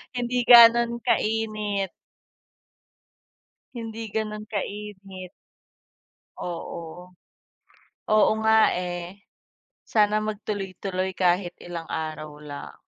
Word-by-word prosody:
Hindi 245 0 -1
gano'n 235 0 +8
kainit. 215 -4 0 1.8
Hindi 225 -2 -6
ganun 215 -1 -3
kainit. 210 0 -4 1.4
Oo. 175 +1 -7 1.0
Oo 215 0 +5
nga, 220 0 +5
eh. 180 +2 -5 0.6
Sana 210 -1 +3
mag 215 -1 -3
tuloy-tuloy 190 -2 -3
kahit 180 0 +1
ilang 170 -2 -7
araw 155 -1 -5
lang. 145 -1 -8
205 Hz, 80 wpm, -25 LUFS, 180-220 Hz, 1.8 s, gano'n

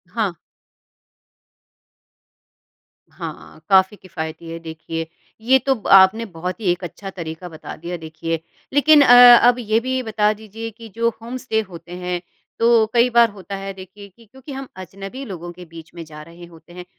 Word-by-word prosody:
हाँ। 210 -6 -1 2.8
हाँ, - - -9
काफ़ी 190 +1 +4
किफ़ायती 165 -3 -7
है 165 - -5
देखिए। 165 0 -6 0.3
ये 255 +4 +4
तो 270 0 +1
ब 220 - -9
आपने 195 +4 +6
बहुत 180 -1 -6
ही 195 -5 +1
एक 175 +1 -4
अच्छा 195 +3 -7
तरीका 170 -1 -7
बता 160 - -9
दिया 175 +2 -6
देखिए। 160 0 -5 0.3
लेकिन 295 +1 +6
अ, 245 -2 +9
अब 245 - +5
ये 220 -1 +1
भी 260 +2 -2
बता 215 -2 +1
दीजिए 220 +1 -8
कि 225 +1 -13
जो 230 0 +1
होम 240 +3 -6
स्टे 225 -3 -1
होते 175 -3 -12
हैं, 180 -1 -3 0.4
तो 230 -1 +4
कई 240 +1 +4
बार 235 -1 +5
होता 200 -1 -8
है 195 0 -6
देखिए 190 +2 -12
कि 230 +5 -22
क्योंकि 265 +6 -13
हम 270 -1 -6
अजनबी 195 +7 -9
लोगों 175 -5 -7
के 180 +1 -12
बीच 165 -1 -13
में 170 - -7
जा 150 -1 -11
रहे 170 +2 -13
होते 170 0 -17
हैं, 180 0 -9
195 Hz, 175 wpm, -20 LUFS, 170-230 Hz, 2.8 s, अ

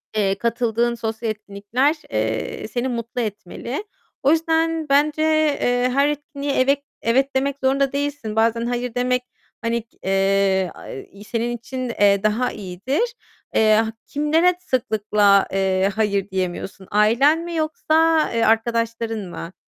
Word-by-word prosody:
Eee, 195 -2 +2
katıldığın 235 +1 0
sosyal 225 0 -3
etkinlikler, 215 +7 -1
eee, 110 - -2
seni 240 +3 -2
mutlu 235 0 -3
etmeli. 215 - -5 0.4
O 275 - +5
yüzden 325 -1 +1
bence, 295 +2 +3
eee, 290 -6 +2
her 280 +2 +3
etkinliğe 290 -1 -4
evet 275 +2 +2 0.2
evet 265 +4 +1
demek 275 +1 +1
zorunda 275 0 +2
değilsin. 285 -6 -3
Bazen 230 +1 +2
"hayır" 245 0 -3
demek, 250 0 +1 0.4
hani, 235 0 -1
k 225 - -31
eee, 195 -1 +2
aaa, 195 +9 -10
senin 240 +1 -2
için, 255 +2 -5
eee, 200 -3 +3
daha 220 +4 +1
iyidir. 215 - -2 0.4
Eee, 215 -1 +5
ha 220 +1 +1
kimlere 320 +5 +2
sıklıkla, 210 - +2
eee, 190 0 +1
"hayır" 200 -2 0
diyemiyorsun? 190 0 -4
Ailen 235 +10 +4
mi 340 0 -5
yoksa, 320 +1 +2
eee, 230 -1 +1
arkadaşların 230 0 0
mı? 170 +1 -7
235 Hz, 135 wpm, -21 LUFS, 210-280 Hz, 0.4 s, O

